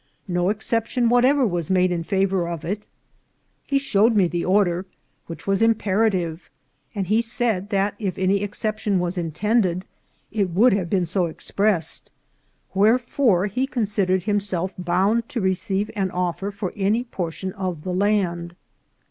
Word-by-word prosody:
No 175 Hz, 0 st, +1 dB
exception 230 Hz, +3 st, 0 dB
whatever 255 Hz, +3 st, +4 dB
was 175 Hz, -6 st, -2 dB
made 185 Hz, -1 st, +3 dB
in 175 Hz, -1 st, -1 dB
favour 190 Hz, 0 st, 0 dB
of 170 Hz, -3 st, -5 dB
it. 205 Hz, +4 st, -4 dB, 0.8 s
He 280 Hz, -, +2 dB
showed 225 Hz, -4 st, +3 dB
me 195 Hz, -4 st, +4 dB
the 170 Hz, 0 st, -2 dB
order, 185 Hz, -1 st, +2 dB, 0.4 s
which 165 Hz, -, -8 dB
was 195 Hz, 0 st, +1 dB
imperative; 200 Hz, -6 st, +1 dB, 0.5 s
and 195 Hz, -2 st, -1 dB
he 215 Hz, +5 st, +2 dB
said 225 Hz, -4 st, -1 dB
that 200 Hz, 0 st, +1 dB
if 195 Hz, -4 st, -3 dB
any 190 Hz, +1 st, +2 dB
exception 210 Hz, 0 st, -1 dB
was 175 Hz, 0 st, -1 dB
intended, 185 Hz, +2 st, 0 dB, 0.5 s
it 200 Hz, -4 st, 0 dB
would 205 Hz, +8 st, +4 dB
have 185 Hz, -4 st, -1 dB
been 185 Hz, -1 st, +1 dB
so 180 Hz, +1 st, 0 dB
expressed; 175 Hz, 0 st, -1 dB, 0.6 s
wherefore 220 Hz, -1 st, +3 dB
he 250 Hz, +6 st, -1 dB
considered 200 Hz, -7 st, 0 dB
himself 195 Hz, -3 st, -1 dB
bound 195 Hz, +6 st, +1 dB
to 245 Hz, -, -3 dB
receive 195 Hz, +1 st, -1 dB
an 195 Hz, -3 st, 0 dB
offer 180 Hz, +1 st, -2 dB
for 200 Hz, -2 st, -5 dB
any 210 Hz, +4 st, +1 dB
portion 185 Hz, -4 st, -5 dB
of 185 Hz, -5 st, -4 dB
the 185 Hz, -, -3 dB
land. 180 Hz, -3 st, 0 dB
195 Hz, 150 wpm, -23 LUFS, 180-215 Hz, 0.8 s, whatever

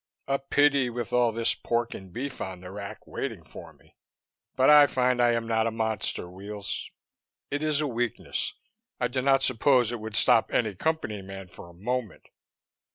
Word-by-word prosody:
"A 135 Hz, 0 st, +1 dB
pity, 140 Hz, -1 st, +3 dB
with 120 Hz, -3 st, -5 dB
all 120 Hz, -1 st, +4 dB
this 115 Hz, +1 st, +2 dB
pork 120 Hz, 0 st, -1 dB
and 95 Hz, -2 st, -10 dB
beef 135 Hz, +7 st, -5 dB
on 95 Hz, -2 st, -5 dB
the 90 Hz, 0 st, -9 dB
rack, 100 Hz, 0 st, -8 dB
waiting -, -, -5 dB
for -, -, -11 dB
me, -, -, -25 dB, 0.6 s
but 130 Hz, -, +4 dB
I 150 Hz, -1 st, +9 dB
find 125 Hz, -2 st, +1 dB
I 120 Hz, -1 st, +4 dB
am 115 Hz, -1 st, -1 dB
not 110 Hz, 0 st, +2 dB
a -, -, +2 dB
monster, 110 Hz, -5 st, -2 dB
Weels. 100 Hz, +2 st, -6 dB, 0.6 s
It 145 Hz, +1 st, -1 dB
is 155 Hz, -1 st, +1 dB
a 150 Hz, -, 0 dB
weakness; 120 Hz, -3 st, -2 dB, 0.4 s
I 125 Hz, -, +1 dB
do 130 Hz, +2 st, -2 dB
not 135 Hz, 0 st, +3 dB
suppose 125 Hz, -1 st, +3 dB
it 120 Hz, -, -4 dB
would 110 Hz, 0 st, -6 dB
stop 110 Hz, -, +4 dB
any 110 Hz, -4 st, +1 dB
Company 110 Hz, -, -2 dB
man 95 Hz, -1 st, -9 dB
for 85 Hz, -, -12 dB
a -, -, -15 dB
moment." 120 Hz, +3 st, -3 dB
120 Hz, 185 wpm, -27 LUFS, 105-130 Hz, 0.6 s, I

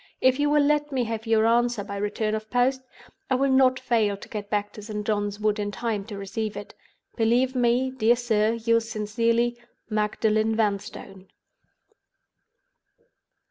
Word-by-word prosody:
If 260 Hz, +1 st, +3 dB
you 290 Hz, 0 st, +2 dB
will 295 Hz, 0 st, +4 dB
let 295 Hz, 0 st, +1 dB
me 260 Hz, -2 st, 0 dB
have 225 Hz, 0 st, -4 dB
your 225 Hz, -1 st, +3 dB
answer 235 Hz, -1 st, +2 dB
by 200 Hz, 0 st, -6 dB
return 210 Hz, +1 st, -2 dB
of 215 Hz, 0 st, -4 dB
post, 255 Hz, +2 st, +1 dB, 0.5 s
I 260 Hz, -, +3 dB
will 270 Hz, +1 st, +2 dB
not 260 Hz, -1 st, +4 dB
fail 225 Hz, -5 st, +1 dB
to -, -, -12 dB
get 205 Hz, -2 st, -6 dB
back 205 Hz, -1 st, -1 dB
to 210 Hz, -, -9 dB
St. 210 Hz, 0 st, -5 dB
John's 205 Hz, -1 st, -1 dB
Wood 215 Hz, 0 st, 0 dB
in 205 Hz, 0 st, -2 dB
time 210 Hz, 0 st, -3 dB
to 210 Hz, -2 st, -8 dB
receive 205 Hz, +1 st, -4 dB
it. 205 Hz, -, -8 dB, 0.4 s
"Believe 245 Hz, +3 st, +2 dB
me, 250 Hz, +1 st, +1 dB
dear 240 Hz, -2 st, +3 dB
sir, 225 Hz, -2 st, +1 dB
yours 230 Hz, 0 st, +1 dB
sincerely, 230 Hz, +2 st, 0 dB, 0.3 s
"MAGDALEN 215 Hz, +1 st, +1 dB
VANSTONE." 200 Hz, -3 st, -3 dB
225 Hz, 160 wpm, -25 LUFS, 210-245 Hz, 0.5 s, will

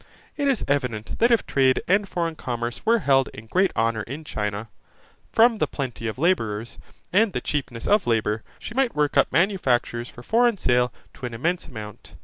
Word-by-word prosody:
It 285 Hz, -1 st, 0 dB
is 270 Hz, -5 st, +1 dB
evident, 125 Hz, -6 st, -2 dB
that 235 Hz, -, +5 dB
if 235 Hz, -3 st, +3 dB
trade 130 Hz, -1 st, +3 dB
and 195 Hz, +2 st, +2 dB
foreign 170 Hz, -2 st, -1 dB
commerce 120 Hz, -4 st, -4 dB
were 230 Hz, +1 st, +5 dB
held 135 Hz, -, +3 dB
in 110 Hz, -, -10 dB
great 185 Hz, +11 st, +2 dB
honour 115 Hz, -1 st, +1 dB
in 140 Hz, +9 st, -7 dB
China, 105 Hz, -5 st, -3 dB, 0.6 s
from 230 Hz, -1 st, +4 dB
the -, -, +2 dB
plenty 125 Hz, -5 st, -4 dB
of 110 Hz, -, -4 dB
labourers, 115 Hz, -, 0 dB, 0.3 s
and 205 Hz, 0 st, +4 dB
the -, -, 0 dB
cheapness 130 Hz, -5 st, -3 dB
of 210 Hz, -1 st, +3 dB
labour, 110 Hz, -2 st, +1 dB, 0.2 s
she -, -, -8 dB
might 260 Hz, -1 st, +1 dB
work 150 Hz, -1 st, +1 dB
up -, -, +4 dB
manufactures 130 Hz, -, +1 dB
for 120 Hz, -, -12 dB
foreign 235 Hz, -, +3 dB
sale 125 Hz, -5 st, +2 dB, 0.2 s
to 125 Hz, -, -6 dB
an 120 Hz, -, -7 dB
immense 170 Hz, +9 st, -1 dB
amount. 105 Hz, -4 st, -10 dB
135 Hz, 185 wpm, -24 LUFS, 115-195 Hz, 0.6 s, that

